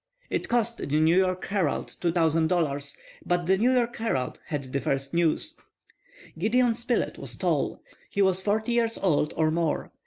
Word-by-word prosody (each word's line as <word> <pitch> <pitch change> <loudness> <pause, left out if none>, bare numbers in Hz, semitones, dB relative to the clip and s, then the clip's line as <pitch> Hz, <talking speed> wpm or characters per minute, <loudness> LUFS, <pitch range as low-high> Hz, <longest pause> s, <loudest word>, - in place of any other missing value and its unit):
It - - -2
cost 235 -1 +1
the - - -4
New 160 +2 +4
York 185 0 +1
Herald 190 -8 -1
$2,000, 160 -4 +1 0.3
but 175 -1 0
the 190 +2 +4
New 235 +6 +3
York 240 -2 +1
Herald 135 - -2
had 140 -4 -4
the 140 - 0
first 135 0 -2
news. 170 -2 +1 0.8
Gideon 235 +5 +3
Spilett 240 +1 -1
was - - -6
tall. - - -1 0.3
He 200 - +1
was 190 -1 +2
forty 215 +4 0
years 230 -1 +1
old 150 -5 +1
or 155 -1 +2
more. 165 -1 -1
180 Hz, 160 wpm, -27 LUFS, 155-225 Hz, 0.8 s, New